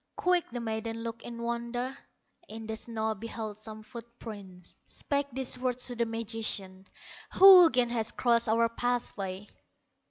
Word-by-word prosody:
Quick 360 -1 +2
the 245 - -5
maiden 225 0 -4
looked 230 0 -5
in 235 -1 -8
wonder, 235 +2 -3 0.5
In 225 0 -8
the 220 0 -4
snow 220 -1 -2
beheld 215 0 -6
some 215 0 -9
foot 235 0 -11
prints, 195 -6 -10
Spake 280 -1 -1
these 255 0 -2
words 250 -1 0
to 245 - -4
the 235 0 0
magician: 220 -4 -4 0.5
"Who 375 -3 +10
again 250 -3 +2
has 230 -2 0
crossed 235 -2 +2
our 230 +1 +4
pathway?" 225 -5 -3
230 Hz, 150 wpm, -30 LUFS, 220-245 Hz, 0.5 s, Who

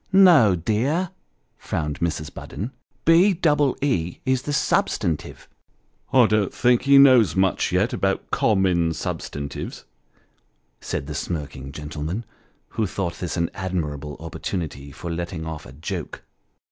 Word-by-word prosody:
" - - -38 0.2
No, 115 - +5
dear," 130 - 0 0.5
frowned 75 -2 -3
Mrs. 75 -3 -2
Budden; 110 +6 -6 0.2
" - - -42
B 185 +5 +6
double 150 -5 +2
E 90 - 0
is 130 -1 +1
the 145 - -4
substantive." 85 - 0 0.3
" - - -41
I 130 -3 +6
don't 105 -2 +1
think 125 -1 +3
he 140 0 +5
knows 125 - +7
much 95 0 +1
yet - - +1
about - - -1
common 90 -6 +2
substantives," 70 -2 -5 0.9
said - - -4
the 75 - -6
smirking 75 -4 -5
gentleman, 75 - -5 0.4
who 110 - -1
thought 85 -2 -3
this 90 0 -3
an 85 -1 0
admirable 75 -6 -4
opportunity 80 -3 -5
for 85 +4 -6
letting 85 -1 -4
off 80 -2 -6
a - - -11
joke. 75 +5 -6
90 Hz, 140 wpm, -23 LUFS, 75-120 Hz, 0.9 s, knows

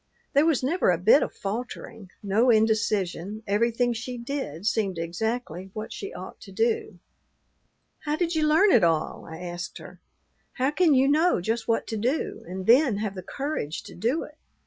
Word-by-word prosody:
There 285 +3 +4
was 305 -6 +2
never 325 - +2
a 175 - +3
bit 210 - +5
of - - -1
faltering, 210 -1 -6
no 210 +5 +3
indecision; 215 -3 +1
everything 235 +4 +1
she 240 +2 -5
did 235 - -5
seemed 205 -4 0
exactly 185 +2 -3
what 215 0 -6
she 400 - -6
ought - - -9
to - - -11
do. 450 -1 0 1.0
"How 295 0 -2
did 340 +1 -1
you 310 -1 +2
learn 330 +7 +5
it 220 - +5
all?" 165 -2 0
I 160 - -8
asked 175 0 -6
her. - - -12 0.5
"How 265 +2 0
can 315 -2 +4
you 265 +1 +4
know 315 - +3
just 225 +6 -2
what 230 -1 +1
to 220 - -4
do, 250 +9 -1
and 185 +1 -5
then 245 -1 +5
have 210 -1 -2
the 185 - -6
courage 270 - -4
to - - -11
do 235 - 0
it? 300 - -13
225 Hz, 180 wpm, -26 LUFS, 195-285 Hz, 1.0 s, bit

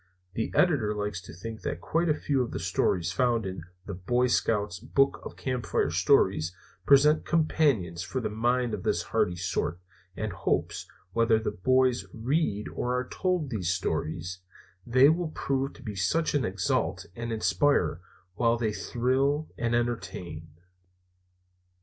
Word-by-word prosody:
The 110 - -2
Editor 125 - +3
likes 105 -3 -3
to 90 - -11
think 110 +4 -8
that - - -3
quite 165 +1 0
a 150 - +3
few 140 -3 0
of 120 - -2
the - - -4
stories 90 0 0
found 120 -3 +1
in 95 -2 -5 0.2
the 100 - -5
Boy 120 +8 +1
Scouts 105 -6 0
Book 135 +7 +1
of - - -8
Campfire 125 -3 -1
Stories 85 +4 +3 0.3
present 150 +2 +6
companions 140 - +1
for 105 +6 -3
the 125 - -2
mind 120 +2 +1
of 105 - -3
this - - 0
hardy 90 - 0
sort, 90 -1 -2 0.4
and 110 -3 -3
hopes, 90 - -1 0.3
whether 115 -1 +4
boys 130 +4 +2
read 115 -3 0
or 125 +1 -1
are 125 - -4
told 180 -7 -1
these 95 -7 -1
stories, 90 -1 -2 0.5
they 130 +3 +6
will 165 +2 +2
prove 135 0 -1
to 135 - -15
be 110 -4 -5
such 100 - 0
as 145 -3 +2
exalt 95 -3 -1
and 115 0 -4
inspire 115 -3 +2 0.3
while 115 +3 +2
they 110 -2 -1
thrill 135 +7 0
and 120 0 0
entertain. 90 -9 -3
115 Hz, 150 wpm, -28 LUFS, 95-135 Hz, 0.5 s, present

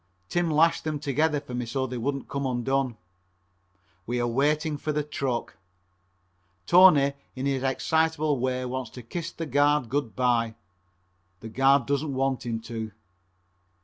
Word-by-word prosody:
Tim 175 -1 +1
lashed 160 +2 +3
them 155 -1 -2
together 150 +2 +1
for 140 -3 -10
me 125 -1 -3
so 130 +3 -1
they 125 -1 -5
wouldn't 140 +3 -2
come 140 -1 -2
undone. 130 0 -1 1.1
We 120 +1 -1
are 120 - +1
waiting 150 +5 +1
for 150 - -3
the 150 0 -1
truck. 135 -4 -3 1.1
Tony 155 - +6 0.2
in 130 +1 -4
his 135 -2 0
excitable 155 +2 +1
way 130 0 -1
wants 125 -1 -4
to 125 - -8
kiss 170 +8 -5
the 165 - -5
guard 145 -2 +2
good 135 -3 -2
by. 120 -3 +1 0.9
The 115 - -7
guard 135 +2 +3
doesn't 140 +1 -1
want 135 -1 -1
him 115 -1 -2
to. 110 -1 -6
135 Hz, 150 wpm, -26 LUFS, 125-150 Hz, 1.1 s, Tony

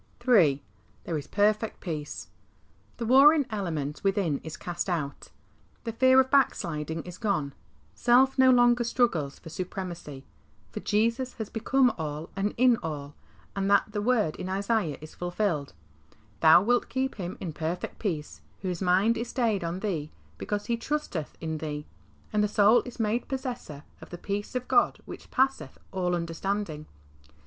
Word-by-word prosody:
III. 160 - +5 0.4
There 170 - -3
is 145 - -4
perfect 215 +1 +1
peace. 155 -5 -5 0.7
The 235 - -3
warring 280 +5 +6
element 160 -8 -3
within 195 -7 +1
is 160 -1 -7
cast 175 +2 -4
out, 150 -5 -3 0.6
the 230 - -3
fear 260 +3 +5
of 260 0 +2
backsliding 165 - +1
is 180 +1 -10
gone, 155 - -1 0.4
self 255 +2 +4
no 260 -1 +6
longer 245 -1 +5
struggles 200 - 0
for - - -11
supremacy, 175 -5 -6 0.5
for - - -5
Jesus 230 +4 0
has 220 -2 -6
become 250 +2 +2
all 155 +1 -5
and 200 +1 -1
in 250 -1 +5
all, 145 -3 -5 0.4
and 195 0 -1
that 205 +1 +3
word 210 -5 +1
in 185 - -5
Isaiah 200 -5 0
is 155 - -10
fulfilled, 175 - -2 0.7
Thou 160 +3 +7
wilt 245 +3 +1
keep 265 -1 -2
him 180 -2 -5
in 170 -4 -5
perfect 165 +3 -4
peace, 160 -8 -4 0.2
whose 180 -2 -3
mind 190 +5 +3
is 235 +2 -3
stayed 230 -6 0
on 170 +3 -3
Thee, 165 -8 -2 0.3
because 205 0 -3
he 235 -1 0
trusteth 235 - -3
in 160 -1 -4
Thee,^' 150 -1 -5 0.5
and 210 0 +3
the - - +3
soul 210 +3 +5
is 245 - -10
made 225 +2 0
possessor 250 - -5 0.2
of - - -11
"the 175 - -7
peace 205 +6 -4
of 250 0 -2
God - - +3
which - - -10
passeth 265 +1 0
all 180 -2 0
understanding. 170 -1 -3
195 Hz, 155 wpm, -27 LUFS, 160-235 Hz, 0.7 s, Thou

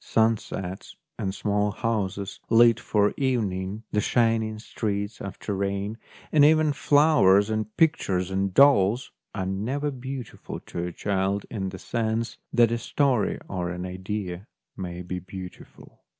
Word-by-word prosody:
Sunsets 105 -4 -1 0.2
and 95 - -1
small 105 +1 0
houses 105 -3 -2
lit 115 0 +6
for 105 -3 +1
evening, 105 -6 -1
the 105 - +1
shining 115 -1 +1
streets 105 -2 -3
after 100 +1 -5
rain, 100 +2 -2 0.4
and 150 -2 +5
even 155 0 +5
flowers 140 -10 +4
and 110 0 -3
pictures 95 - +2
and 95 0 0
dolls, 120 -1 +4 0.2
are 95 -3 -2
never 125 +10 -2
beautiful 130 -2 -7
to 85 0 -5
a - - -5
child 100 +2 -1
in 95 -4 -3
the 95 - -8
sense 115 +2 -2
that 120 -1 +4
a 120 - 0
story 130 -5 +1
or 90 -2 -3
an 90 +1 -4
idea 95 +1 -5 0.3
may 90 -1 -6
t>e 90 0 -5
beautiful. 95 -1 -11
105 Hz, 135 wpm, -26 LUFS, 95-115 Hz, 0.4 s, lit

